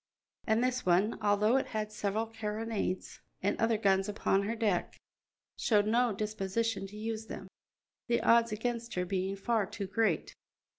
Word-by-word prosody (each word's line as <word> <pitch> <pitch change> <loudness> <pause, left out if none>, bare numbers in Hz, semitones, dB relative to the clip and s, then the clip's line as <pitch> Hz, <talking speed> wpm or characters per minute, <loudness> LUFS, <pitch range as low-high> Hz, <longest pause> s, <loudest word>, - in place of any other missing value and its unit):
And 220 +2 +3
this 255 0 0
one, 185 +5 +2
although 210 +4 +3
it 270 - -1
had 215 0 -2
several 210 +1 -1
carronades 220 -3 -3 0.2
and 200 - +2
other 225 -1 +3
guns 195 -1 +2
upon 200 -1 +1
her 230 - -1
deck, 210 -6 0 0.6
showed 210 -3 +3
no 235 +2 +3
disposition 210 0 -2
to 205 +2 -11
use 220 0 -4
them, 190 - -7 0.6
the 235 -1 +2
odds 230 0 +4
against 235 +2 -3
her 180 0 0
being 190 +1 -1
far 210 0 0
too 205 0 -5
great. 195 -3 0
215 Hz, 155 wpm, -31 LUFS, 195-225 Hz, 0.6 s, odds